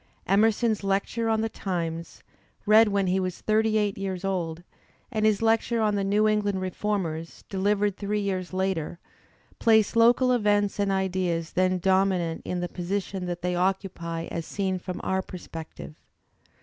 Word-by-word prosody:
Emerson's 215 Hz, +2 st, +2 dB
"Lecture 200 Hz, +4 st, 0 dB
on 220 Hz, 0 st, +2 dB
the 225 Hz, -, 0 dB
Times," 170 Hz, -5 st, -4 dB, 0.4 s
read 220 Hz, +1 st, +7 dB
when 200 Hz, -1 st, +1 dB
he 185 Hz, +1 st, +1 dB
was 185 Hz, -1 st, -3 dB
thirty 220 Hz, 0 st, +2 dB
eight 205 Hz, -2 st, 0 dB
years 190 Hz, -1 st, -3 dB
old, 175 Hz, -3 st, -2 dB, 0.5 s
and 215 Hz, -2 st, +2 dB
his 215 Hz, 0 st, +1 dB
lecture 225 Hz, +1 st, +2 dB
on 215 Hz, -1 st, +2 dB
the 200 Hz, -1 st, 0 dB
"New 205 Hz, +2 st, +2 dB
England 205 Hz, -2 st, +1 dB
Reformers," 185 Hz, -4 st, -3 dB
delivered 205 Hz, +1 st, +1 dB
three 210 Hz, +1 st, -1 dB
years 190 Hz, -3 st, -2 dB
later, 185 Hz, -3 st, -2 dB, 0.6 s
place 220 Hz, -1 st, +4 dB
local 240 Hz, +2 st, +5 dB
events 205 Hz, -4 st, +2 dB
and 200 Hz, -1 st, +1 dB
ideas 185 Hz, -3 st, -1 dB
then 185 Hz, 0 st, +2 dB
dominant 185 Hz, -2 st, +1 dB
in 180 Hz, -1 st, -2 dB
the 175 Hz, -, -1 dB
position 185 Hz, +1 st, -3 dB
that 175 Hz, -1 st, -5 dB
they 180 Hz, 0 st, 0 dB
occupy 180 Hz, -3 st, -1 dB
as 170 Hz, -, -3 dB
seen 190 Hz, +2 st, -2 dB
from 180 Hz, 0 st, -6 dB
our 190 Hz, 0 st, 0 dB
perspective. 165 Hz, -4 st, -9 dB
195 Hz, 155 wpm, -26 LUFS, 180-210 Hz, 0.6 s, read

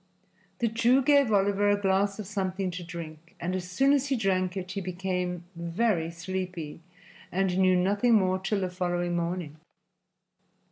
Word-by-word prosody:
The 235 Hz, -, +1 dB
Jew 235 Hz, +4 st, +3 dB
gave 280 Hz, -3 st, +4 dB
Oliver 205 Hz, 0 st, +3 dB
a 205 Hz, 0 st, +3 dB
glass 195 Hz, 0 st, +1 dB
of 215 Hz, -, -6 dB
something 190 Hz, -1 st, -2 dB
to 175 Hz, +1 st, -6 dB
drink, 165 Hz, -1 st, -9 dB
and 180 Hz, +2 st, -2 dB
as 180 Hz, -1 st, -4 dB
soon 270 Hz, +10 st, +3 dB
as 285 Hz, -1 st, +2 dB
he 275 Hz, -, +1 dB
drank 185 Hz, -4 st, 0 dB
it 185 Hz, 0 st, -5 dB
he 195 Hz, -, -3 dB
became 180 Hz, -1 st, -3 dB
very 170 Hz, 0 st, 0 dB
sleepy 175 Hz, -2 st, -5 dB, 0.5 s
and 190 Hz, -1 st, 0 dB
knew 185 Hz, -1 st, +4 dB
nothing 205 Hz, +6 st, +3 dB
more 185 Hz, -2 st, +2 dB
till 195 Hz, +1 st, -1 dB
the 185 Hz, -1 st, -2 dB
following 175 Hz, -1 st, -1 dB
morning. 170 Hz, -3 st, -3 dB
185 Hz, 160 wpm, -28 LUFS, 175-205 Hz, 0.5 s, gave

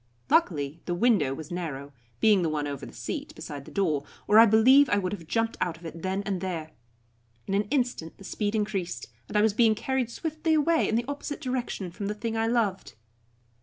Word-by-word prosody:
Luckily 165 Hz, -, +2 dB
the 175 Hz, -, -1 dB
window 190 Hz, -, +3 dB
was 155 Hz, +2 st, -9 dB
narrow, 145 Hz, -5 st, -5 dB, 0.3 s
being 210 Hz, -4 st, +5 dB
the 165 Hz, -, +1 dB
one 150 Hz, -1 st, -1 dB
over 140 Hz, -2 st, -5 dB
the -, -, -11 dB
seat, -, -, -5 dB
beside 140 Hz, -2 st, -7 dB
the -, -, -12 dB
door, 160 Hz, -8 st, 0 dB, 0.2 s
or 215 Hz, -, +7 dB
I 230 Hz, -, +9 dB
believe 255 Hz, +6 st, +6 dB
I 205 Hz, -, +3 dB
would 185 Hz, -2 st, -1 dB
have 170 Hz, -6 st, -7 dB
jumped 225 Hz, +5 st, 0 dB
out 170 Hz, -2 st, -1 dB
of 170 Hz, -, -15 dB
it 165 Hz, 0 st, -7 dB
then 190 Hz, +2 st, -1 dB
and 195 Hz, -3 st, -2 dB
there. 165 Hz, -4 st, -4 dB, 0.7 s
In 195 Hz, -, -3 dB
an 205 Hz, +1 st, +2 dB
instant 245 Hz, -, -1 dB
the -, -, -13 dB
speed 205 Hz, +2 st, -2 dB
increased, 205 Hz, -5 st, -2 dB, 0.2 s
and -, -, -1 dB
I 210 Hz, -, +4 dB
was 220 Hz, -2 st, +3 dB
being 220 Hz, 0 st, +4 dB
carried 260 Hz, +1 st, -1 dB
swiftly 315 Hz, +4 st, -1 dB
away 320 Hz, +2 st, +3 dB
in 220 Hz, -, +1 dB
the 235 Hz, +1 st, +1 dB
opposite 285 Hz, +1 st, -4 dB
direction 250 Hz, -8 st, -3 dB
from 200 Hz, +3 st, -5 dB
the 210 Hz, -, -2 dB
thing 225 Hz, +2 st, -3 dB
I 225 Hz, 0 st, +1 dB
loved. 225 Hz, -5 st, 0 dB
205 Hz, 215 wpm, -27 LUFS, 170-235 Hz, 0.7 s, I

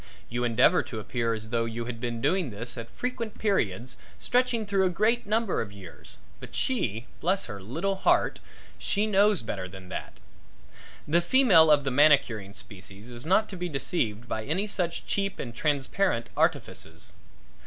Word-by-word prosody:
You 120 Hz, +1 st, -2 dB
endeavor 120 Hz, +9 st, +4 dB
to 110 Hz, -, -6 dB
appear 115 Hz, +1 st, -1 dB
as 110 Hz, 0 st, -6 dB
though 115 Hz, -1 st, +1 dB
you 115 Hz, +1 st, -4 dB
had 115 Hz, -1 st, -6 dB
been 120 Hz, -1 st, -3 dB
doing 185 Hz, -2 st, +1 dB
this 115 Hz, +3 st, -3 dB
at 115 Hz, -1 st, -7 dB
frequent 235 Hz, -3 st, -4 dB
periods 125 Hz, -, 0 dB, 0.2 s
stretching 245 Hz, -3 st, +1 dB
through 200 Hz, -1 st, +2 dB
a 185 Hz, -, +3 dB
great 215 Hz, +6 st, +1 dB
number 220 Hz, -1 st, +1 dB
of 100 Hz, -, -5 dB
years, 95 Hz, -4 st, -11 dB, 0.2 s
but -, -, -10 dB
she 120 Hz, -, -1 dB
bless 190 Hz, +3 st, +1 dB
her 105 Hz, -3 st, -7 dB
little 165 Hz, -, -2 dB
heart! -, -, +2 dB, 0.4 s
she 205 Hz, +1 st, 0 dB
knows 205 Hz, -, +3 dB
better 95 Hz, -4 st, -4 dB
than 95 Hz, 0 st, -11 dB
that. -, -, -5 dB, 0.9 s
The 170 Hz, +4 st, +3 dB
female 190 Hz, -6 st, +6 dB
of 145 Hz, -2 st, +5 dB
the 135 Hz, -, -1 dB
manicuring 125 Hz, -8 st, +3 dB
species 100 Hz, -1 st, -8 dB
is 120 Hz, +4 st, -7 dB
not 215 Hz, +4 st, +4 dB
to 195 Hz, -, -6 dB
be 180 Hz, 0 st, -3 dB
deceived 125 Hz, -, -2 dB
by 110 Hz, -2 st, -3 dB
any 170 Hz, -, -1 dB
such 180 Hz, -5 st, -2 dB
cheap 195 Hz, -1 st, -1 dB
and 120 Hz, -3 st, -5 dB
transparent 145 Hz, 0 st, 0 dB
artifices. -, -, -1 dB
140 Hz, 170 wpm, -27 LUFS, -, 0.9 s, female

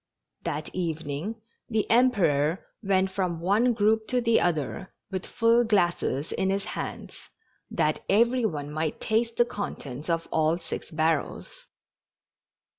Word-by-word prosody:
That 150 Hz, +1 st, -3 dB
evening 165 Hz, +2 st, -3 dB, 0.3 s
the 220 Hz, -2 st, 0 dB
Emperor 185 Hz, -, +3 dB, 0.2 s
went 190 Hz, -2 st, +1 dB
from 185 Hz, -4 st, -1 dB
one 210 Hz, +8 st, +3 dB
group 220 Hz, 0 st, +2 dB
to 250 Hz, -, +1 dB
the 230 Hz, -2 st, +3 dB
other 175 Hz, +2 st, -2 dB, 0.2 s
with 185 Hz, -1 st, -4 dB
full 230 Hz, 0 st, +3 dB
glasses 175 Hz, -, +1 dB
in 190 Hz, -, 0 dB
his 195 Hz, 0 st, 0 dB
hands, -, -, -6 dB, 0.4 s
that -, -, 0 dB
every 235 Hz, +4 st, +3 dB
one 150 Hz, -8 st, -2 dB
might 155 Hz, 0 st, -2 dB
taste 230 Hz, +1 st, 0 dB
the 240 Hz, -, +4 dB
con 205 Hz, -4 st, -4 dB
tents 140 Hz, +4 st, -8 dB
of 165 Hz, 0 st, 0 dB
all 160 Hz, +1 st, +2 dB
six 165 Hz, -2 st, -6 dB
barrels. 165 Hz, -, -2 dB
190 Hz, 135 wpm, -27 LUFS, 160-225 Hz, 0.4 s, the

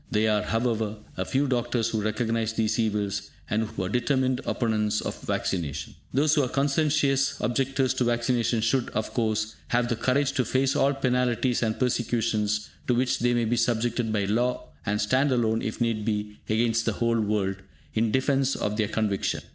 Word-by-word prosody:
There 110 Hz, -2 st, +2 dB
are, 105 Hz, -1 st, +2 dB
however, 110 Hz, -2 st, -1 dB, 0.2 s
a 95 Hz, -, -2 dB
few 135 Hz, +7 st, +1 dB
doctors 120 Hz, -3 st, 0 dB
who 110 Hz, -2 st, -1 dB
recognise 115 Hz, +1 st, -1 dB
these 110 Hz, +1 st, 0 dB
evils, 100 Hz, -2 st, -1 dB, 0.2 s
and 110 Hz, 0 st, 0 dB
who 105 Hz, -3 st, -5 dB
are -, -, -1 dB
determined 130 Hz, +2 st, +1 dB
opponents 105 Hz, -3 st, 0 dB
of -, -, -5 dB
vaccination. 80 Hz, -6 st, -2 dB, 0.2 s
Those 145 Hz, +3 st, +3 dB
who 150 Hz, -, +4 dB
are 130 Hz, -, 0 dB
conscientious 140 Hz, -1 st, +1 dB
objectors 135 Hz, +1 st, +1 dB
to -, -, 0 dB
vaccination 120 Hz, -1 st, +1 dB
should, 120 Hz, +3 st, +1 dB
of 110 Hz, 0 st, -2 dB
course, 110 Hz, -2 st, 0 dB
have 120 Hz, 0 st, +1 dB
the 120 Hz, -, +1 dB
courage 135 Hz, +4 st, +1 dB
to 130 Hz, -, +1 dB
face 135 Hz, +2 st, +1 dB
all 140 Hz, +1 st, +3 dB
penalties 125 Hz, -2 st, +1 dB
or 110 Hz, -2 st, +1 dB
persecutions 110 Hz, -4 st, 0 dB, 0.2 s
to 125 Hz, -, +3 dB
which 125 Hz, +1 st, +1 dB
they 120 Hz, 0 st, +2 dB
may 120 Hz, -1 st, +1 dB
be 120 Hz, +2 st, 0 dB
subjected 120 Hz, -1 st, 0 dB
by 105 Hz, -2 st, +1 dB
law, 120 Hz, -, 0 dB, 0.2 s
and 105 Hz, +1 st, +1 dB
stand 130 Hz, +7 st, +2 dB
alone, 115 Hz, -3 st, +1 dB
if 110 Hz, -, -4 dB
need 115 Hz, -3 st, 0 dB
be, 105 Hz, -1 st, -3 dB
against 115 Hz, +1 st, +2 dB
the 115 Hz, -, +1 dB
whole 115 Hz, +1 st, +1 dB
world, 100 Hz, -2 st, 0 dB, 0.4 s
in 115 Hz, 0 st, +1 dB
defence 135 Hz, +2 st, +1 dB
of 105 Hz, 0 st, -2 dB
their 110 Hz, -2 st, +1 dB
conviction. 105 Hz, -3 st, -1 dB
115 Hz, 180 wpm, -26 LUFS, 110-125 Hz, 0.4 s, who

